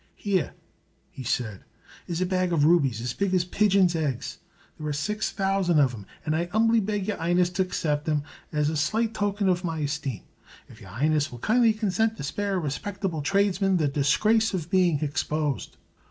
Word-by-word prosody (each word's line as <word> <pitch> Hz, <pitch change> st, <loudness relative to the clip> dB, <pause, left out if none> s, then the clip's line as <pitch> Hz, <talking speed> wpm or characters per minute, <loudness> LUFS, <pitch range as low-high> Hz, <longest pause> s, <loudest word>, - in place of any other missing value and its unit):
"Here," 190 Hz, -7 st, -1 dB, 0.6 s
he -, -, -9 dB
said, 110 Hz, -5 st, -2 dB, 0.4 s
"is 170 Hz, 0 st, -3 dB
a -, -, +2 dB
bag 185 Hz, -1 st, 0 dB
of 150 Hz, -4 st, +3 dB
rubies 140 Hz, -9 st, +3 dB
as 120 Hz, 0 st, -3 dB
big 195 Hz, -2 st, 0 dB
as 180 Hz, -1 st, +2 dB
pigeon's 190 Hz, -2 st, +3 dB
eggs. 145 Hz, -7 st, -3 dB, 0.4 s
There 155 Hz, -, -4 dB
are 150 Hz, -, -1 dB
six 210 Hz, +9 st, -2 dB
thousand 195 Hz, -3 st, +1 dB
of 135 Hz, -3 st, +4 dB
them, 105 Hz, -5 st, -10 dB, 0.2 s
and 155 Hz, -1 st, 0 dB
I 170 Hz, +2 st, -1 dB
'umbly 225 Hz, +1 st, +4 dB
beg 205 Hz, -1 st, -2 dB
your 210 Hz, -, -1 dB
'Ighness 175 Hz, +1 st, +2 dB
to 190 Hz, 0 st, +1 dB
haccept 150 Hz, -5 st, -1 dB
them 150 Hz, -2 st, 0 dB, 0.3 s
as 150 Hz, 0 st, +1 dB
a -, -, -3 dB
slight 220 Hz, +9 st, 0 dB
token 205 Hz, -1 st, -1 dB
hof 180 Hz, -1 st, +1 dB
my 165 Hz, -2 st, -2 dB
hesteem, 145 Hz, -4 st, -3 dB, 0.4 s
if -, -, -16 dB
your -, -, -12 dB
'Ighness 150 Hz, +3 st, 0 dB
will 120 Hz, -, -8 dB
kindly 230 Hz, -, +3 dB
consent 220 Hz, +1 st, 0 dB
to -, -, -6 dB
spare 200 Hz, +7 st, -2 dB
a -, -, -1 dB
respeckable 180 Hz, +2 st, -3 dB
tradesman 195 Hz, +2 st, +2 dB
the 155 Hz, -3 st, +1 dB
disgrace 210 Hz, +11 st, +2 dB
of 170 Hz, -2 st, -5 dB
being 180 Hz, -5 st, +3 dB
hexposed." 150 Hz, 0 st, -2 dB
175 Hz, 190 wpm, -26 LUFS, 150-200 Hz, 0.6 s, of